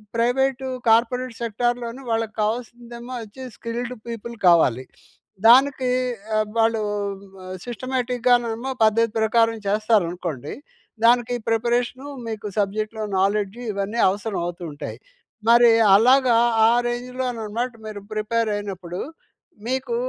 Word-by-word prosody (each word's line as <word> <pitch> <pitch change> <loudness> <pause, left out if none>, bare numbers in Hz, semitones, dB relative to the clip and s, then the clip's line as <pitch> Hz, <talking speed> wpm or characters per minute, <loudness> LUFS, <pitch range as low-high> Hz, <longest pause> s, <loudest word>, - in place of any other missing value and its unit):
Private, 265 +3 +1 0.2
corporate 245 +2 +2
సెక్టార్‌లోని 240 +2 -2
వాళ్ళకు 225 -1 -1
కావాల్సిందేమో 240 +2 -5
అచ్చి 225 +5 -11
skilled 240 +1 -4
people 235 0 -6
కావాలి. 145 -8 +4 0.6
దానికీ 260 +1 +5 0.5
ఆబ్ 215 -1 -1
వాళ్ళూ 225 -1 +2 0.8
సిస్టమాటిక్‌గానేమో 245 -1 0
పద్ధతి 220 +1 +3
ప్రకారం 225 +1 +2
చేస్తారనుకోండి. 180 - 0 0.5
దానికి 240 0 +4
ప్రిపరేషను 240 +4 0 0.2
మీకు 215 -2 -5
సబ్జెక్ట్‌లో 215 +2 -1 0.2
నాలెడ్జి 205 +3 0
ఇవన్నీ 200 +3 -3
అవసరవవుతూ 185 -4 -4
ఉంటాయి. 145 - -7 0.5
మరి 235 0 +7 0.2
అలాగా, 250 +2 +5 0.3
ఆ - - +5 0.2
రేంజ్‌లోననమాట 245 -1 -3 0.2
మీరు 205 -1 -7
ప్రిపేరయినప్పుడు, 205 -5 -2 0.7
మీకు 260 -1 -2
230 Hz, 95 wpm, -23 LUFS, 210-245 Hz, 0.8 s, మరి